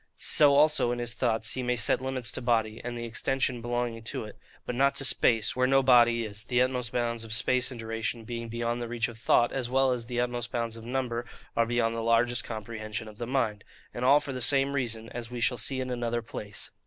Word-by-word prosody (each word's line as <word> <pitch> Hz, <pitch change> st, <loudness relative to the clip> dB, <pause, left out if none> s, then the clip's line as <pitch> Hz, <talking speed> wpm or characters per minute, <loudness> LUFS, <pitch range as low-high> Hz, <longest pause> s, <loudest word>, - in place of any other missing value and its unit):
So 145 Hz, -2 st, +4 dB
also, 150 Hz, -4 st, +4 dB
in 120 Hz, -, -2 dB
his 120 Hz, -1 st, -2 dB
thoughts, 115 Hz, -3 st, 0 dB
he 130 Hz, -, -3 dB
may 125 Hz, 0 st, 0 dB
set 115 Hz, +1 st, +1 dB
limits 130 Hz, -2 st, -2 dB
to -, -, -3 dB
body, 115 Hz, -2 st, 0 dB
and 120 Hz, 0 st, -4 dB
the 120 Hz, -, -4 dB
extension 125 Hz, +1 st, -1 dB
belonging 120 Hz, -1 st, -2 dB
to -, -, -4 dB
it; 105 Hz, -, -10 dB, 0.3 s
but -, -, -3 dB
not 140 Hz, +3 st, +2 dB
to 135 Hz, -, -2 dB
space, 115 Hz, -4 st, +2 dB
where 130 Hz, 0 st, +2 dB
no 135 Hz, 0 st, +4 dB
body 120 Hz, -2 st, +5 dB
is, 105 Hz, 0 st, -5 dB
the 125 Hz, +1 st, 0 dB
utmost 125 Hz, -2 st, 0 dB
bounds 115 Hz, -1 st, -1 dB
of 110 Hz, -1 st, -6 dB
space 125 Hz, +2 st, +1 dB
and 125 Hz, -3 st, -8 dB
duration 115 Hz, +1 st, -3 dB
being 115 Hz, 0 st, -5 dB
beyond 120 Hz, +1 st, -2 dB
the 120 Hz, -, -3 dB
reach 115 Hz, 0 st, -1 dB
of 115 Hz, -1 st, -11 dB
thought, 120 Hz, +1 st, +3 dB
as 130 Hz, -3 st, -2 dB
well 135 Hz, +1 st, +3 dB
as 120 Hz, -2 st, -3 dB
the 120 Hz, 0 st, -2 dB
utmost 120 Hz, 0 st, -2 dB
bounds 115 Hz, -1 st, -2 dB
of 115 Hz, -, -9 dB
number 120 Hz, -1 st, -2 dB, 0.3 s
are 115 Hz, 0 st, +2 dB
beyond 115 Hz, -1 st, +1 dB
the 115 Hz, -, -3 dB
largest 115 Hz, +1 st, +2 dB
comprehension 110 Hz, 0 st, -6 dB
of 105 Hz, -1 st, -12 dB
the 120 Hz, -, -4 dB
mind; 110 Hz, -6 st, -1 dB, 0.3 s
and 120 Hz, -, -4 dB
all 140 Hz, +3 st, +6 dB
for 140 Hz, -2 st, -6 dB
the 130 Hz, -, -4 dB
same 135 Hz, +2 st, +3 dB
reason, 115 Hz, -5 st, -2 dB
as 120 Hz, -2 st, -6 dB
we 125 Hz, -1 st, -6 dB
shall 120 Hz, +2 st, +2 dB
see 130 Hz, +4 st, -1 dB
in 130 Hz, -1 st, -3 dB
another 120 Hz, -1 st, -2 dB
place. 105 Hz, -5 st, -6 dB
120 Hz, 240 wpm, -28 LUFS, 115-125 Hz, 0.3 s, all